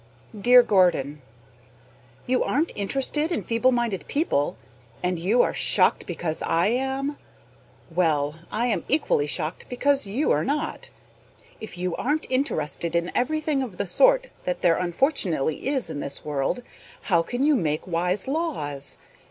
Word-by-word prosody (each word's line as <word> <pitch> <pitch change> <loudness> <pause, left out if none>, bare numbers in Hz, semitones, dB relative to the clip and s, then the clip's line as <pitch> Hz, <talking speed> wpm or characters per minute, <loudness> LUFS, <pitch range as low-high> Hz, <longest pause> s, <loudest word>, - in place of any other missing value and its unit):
Dear 245 +4 +6
Gordon: 170 - +2 1.0
You 255 0 +1
aren't 305 +6 0
interested 275 - -1
in - - -1
feeble 230 +3 +2
minded 230 -10 -1
people, 280 - 0 0.5
and 180 -1 0
you 210 +8 +3
are - - -1
shocked - - +2
because 165 -2 -2
I 170 +5 +2
am? 270 +4 -1 0.7
Well, 160 -3 0
I 230 +3 0
am 245 - 0
equally 275 - +2
shocked 155 +3 -3
because 275 0 +1
you 245 +10 0
are - - +2
not. 295 +3 -3 0.7
If 220 -4 -8
you 180 -1 -2
aren't 300 +4 -1
interested 170 - -1
in 170 +1 0
everything 305 +1 0
of 225 -9 -6
the 200 - -1
sort - - +3
that 180 -1 -3
there 170 -2 +4
unfortunately 180 - 0
is 270 -7 0
in 155 -3 -5
this 140 -1 -4
world, 150 - -1 0.4
how 170 -5 +2
can 245 +10 -2
you 300 0 +4
make 155 - -1
wise 180 +3 -1
laws? 150 - -2
205 Hz, 145 wpm, -25 LUFS, 165-270 Hz, 1.0 s, Dear